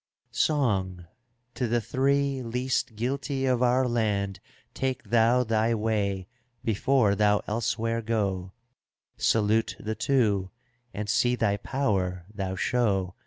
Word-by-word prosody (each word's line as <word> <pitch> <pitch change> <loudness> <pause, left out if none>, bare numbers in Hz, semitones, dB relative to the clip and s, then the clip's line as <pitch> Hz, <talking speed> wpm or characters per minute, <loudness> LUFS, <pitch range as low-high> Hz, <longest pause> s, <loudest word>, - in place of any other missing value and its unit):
^^ - - -17
Song, 95 - 0 0.5
to 125 - -1
the 120 +1 +1
three 135 +4 0
least 125 0 -2
guilty 135 +4 -2
of 125 -2 +1
our 125 +1 +3
land 105 -5 -1 0.3
Take 130 0 -2
thou 120 +2 +4
thy 115 0 +1
way 100 -4 -1 0.4
before 115 0 +2
thou 105 0 +2
elsewhere 115 +1 -1
go; 100 -5 -1 0.7
Salute 110 0 +2
the 110 - -3
two, 110 -5 +1 0.4
and 105 +2 -5
see 120 +3 +2
thy 100 -4 +1
power 95 -9 -1
thou 95 -2 -3
show. 95 -3 0
115 Hz, 120 wpm, -27 LUFS, 100-125 Hz, 0.7 s, thou